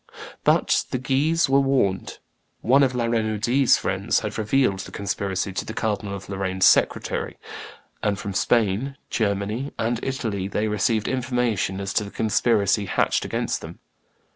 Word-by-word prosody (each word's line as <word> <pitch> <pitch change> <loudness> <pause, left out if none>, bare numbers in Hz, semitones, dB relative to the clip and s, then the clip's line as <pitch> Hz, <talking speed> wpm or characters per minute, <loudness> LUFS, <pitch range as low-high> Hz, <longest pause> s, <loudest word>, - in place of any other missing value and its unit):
But - - +3
the - - -1
Guises 145 +6 +1
were 135 +1 +4
warned; 130 -9 0 0.4
one 135 +4 +4
of 130 -2 +2
La 120 -1 0
Renaudie's 115 +3 +2
friends - - 0
had - - -4
revealed 110 -2 +1
the 95 - -7
conspiracy 100 -1 -2
to - - -2
the 110 - -7
Cardinal 105 -2 -2
of 95 0 -9
Lorraine's 95 -1 0
secretary; - - +2 0.6
and 105 -2 0
from 100 -1 -5
Spain, 115 +6 +1
Germany, 105 +5 -1
and 115 +1 -1
Italy 110 -8 -2
they 105 +2 -1
received 110 +1 0
information 120 -7 -1
as 100 0 -4
to 105 - +1
the 100 - -7
conspiracy 105 -2 +1
hatched - - +1
against - - -2
them. - - -9
110 Hz, 150 wpm, -23 LUFS, 100-125 Hz, 0.6 s, were